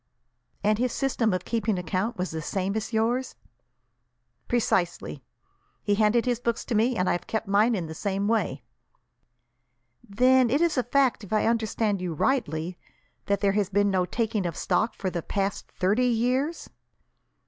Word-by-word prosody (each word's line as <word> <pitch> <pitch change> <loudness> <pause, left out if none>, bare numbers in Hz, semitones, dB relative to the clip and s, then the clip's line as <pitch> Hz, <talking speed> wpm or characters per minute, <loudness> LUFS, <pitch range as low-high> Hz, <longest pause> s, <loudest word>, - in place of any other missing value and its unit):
"And 210 +1 +2
his 250 0 +1
system 255 -5 0
of 185 -1 -2
keeping 225 -3 0
account 185 +7 -2
was 180 +1 -2
the 160 0 -4
same 190 +5 -2
as 220 +1 -3
yours?" 235 +3 0 1.1
"Precisely. 185 -7 0 0.6
He 205 - +1
handed 215 +3 +3
his 245 -2 0
books 235 -1 -2
to - - -3
me, 230 +3 +2
and 180 - +1
I - - +3
have 175 - -3
kept 220 -1 -2
mine 210 +4 +3
in 180 -4 -2
the 160 - -7
same 200 +3 -2
way." 220 -3 0 1.4
"Then 250 +3 +3
it 280 +5 +2
is 340 -1 +2
a 255 - +3
fact, 255 -1 +1
if 200 - -11
I 215 - +2
understand 220 -3 0
you 175 -3 -3
rightly, 170 - -1 0.5
that 200 -1 +1
there 200 -1 +3
has 200 -1 0
been 205 0 +2
no 185 -1 +2
taking 220 -4 -1
of 165 - -5
stock 220 - 0
for 190 -2 -3
the 175 - -3
past 195 +3 -3
thirty 205 +7 +1
years?" 250 +7 0
215 Hz, 170 wpm, -26 LUFS, 190-240 Hz, 1.4 s, handed